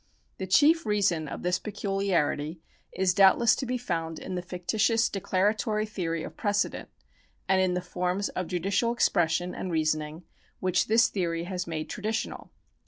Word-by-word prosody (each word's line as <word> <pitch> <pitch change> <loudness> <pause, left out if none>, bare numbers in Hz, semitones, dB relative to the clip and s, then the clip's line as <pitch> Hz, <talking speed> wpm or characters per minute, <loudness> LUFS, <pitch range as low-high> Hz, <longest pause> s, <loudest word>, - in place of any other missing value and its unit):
^ - - -50
The 190 - -3
chief 300 - +5
reason 190 -7 +1
of - - -7
this 180 +1 +1
peculiarity 195 -6 -1 0.3
is 185 0 +1
doubtless 195 +5 +5
to 265 - -3
be 250 +1 -1
found 165 -8 -3
in 190 - -6
the 180 - -2
fictitious 215 +6 +1
declaratory 210 +2 0
theory 165 -6 -3
of - - -8
precedent, 205 -1 -1 0.6
and 190 0 +3
in 185 -1 +1
the 180 - -1
forms 180 +2 -2
of 185 -2 -4
judicial 195 +6 0
expression 175 -5 +1
and 185 - -5
reasoning 155 0 -1 0.4
which 185 -1 +1
this 225 +2 +5
theory 170 -4 -2
has 180 0 -4
made 155 -2 -4
traditional. 215 +2 -4
185 Hz, 160 wpm, -27 LUFS, 175-210 Hz, 0.6 s, chief